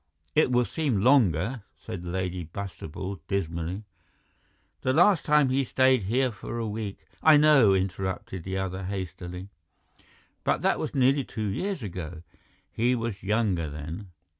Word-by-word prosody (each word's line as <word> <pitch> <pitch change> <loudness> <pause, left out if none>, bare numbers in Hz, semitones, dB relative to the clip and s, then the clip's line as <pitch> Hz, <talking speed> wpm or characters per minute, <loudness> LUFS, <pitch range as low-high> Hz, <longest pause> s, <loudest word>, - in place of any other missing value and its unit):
"It 155 -4 +3
will 125 0 +3
seem 135 -11 -1
longer," 115 - +3 0.2
said 85 +2 -7
Lady 90 0 -3
Bastable 95 +1 -6
dismally. 85 0 -2 1.0
"The 130 - +1
last 175 +2 +5
time 150 -3 +4
he 135 +1 +2
stayed 130 -3 +3
here 125 +5 +1
for 115 +2 -7
a 115 - -2
week—" 105 -2 -5 0.2
"I 155 -1 +7
know," 140 -10 +6
interrupted 95 -1 -3
the 95 +1 -3
other 95 0 -3
hastily, 90 -1 -5 0.9
"but - - 0
that - - +2
was - - -4
nearly 135 +1 +3
two 110 -3 -5
years 185 - -2
ago. 85 -4 -6 0.5
He 120 +3 +2
was 115 -4 -3
younger 100 -6 0
then." 80 +7 -7
100 Hz, 140 wpm, -27 LUFS, 90-130 Hz, 1.0 s, I